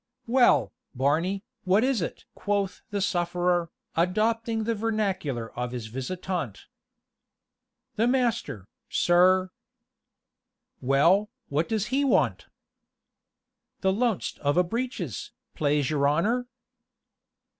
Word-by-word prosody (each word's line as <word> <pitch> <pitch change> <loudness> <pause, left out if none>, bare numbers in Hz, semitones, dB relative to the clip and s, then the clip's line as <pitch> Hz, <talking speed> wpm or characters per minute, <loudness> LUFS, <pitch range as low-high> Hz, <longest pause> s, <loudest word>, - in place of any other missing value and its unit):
"Well, 245 +1 +4 0.2
Barney, 165 +10 +1 0.2
what 195 +4 +3
is 260 -5 +1
it?" 165 - -5
quoth 200 -2 -2
the 205 -1 -2
sufferer, 175 -2 +1 0.3
adopting 220 +6 +1
the 230 +1 0
vernacular 195 - -2
of 125 0 -4
his 120 -3 -4
visitant. 160 - -4 1.3
"The 225 +2 +3
master, 240 - 0 0.2
sir 185 +1 +4 0.6
" - - -55
"Well, 180 +10 +4 0.2
what 150 +4 0
does 215 -2 -1
he 280 +2 +3
want?" 275 - +2 1.3
"The 190 -1 +2
loanst 230 -2 -1
of 145 +3 0
a 180 - +6
breeches, 240 +8 -4 0.2
plase 145 -1 +1
your 140 -2 +2
honor." 220 +12 +1
185 Hz, 105 wpm, -27 LUFS, 155-220 Hz, 1.3 s, a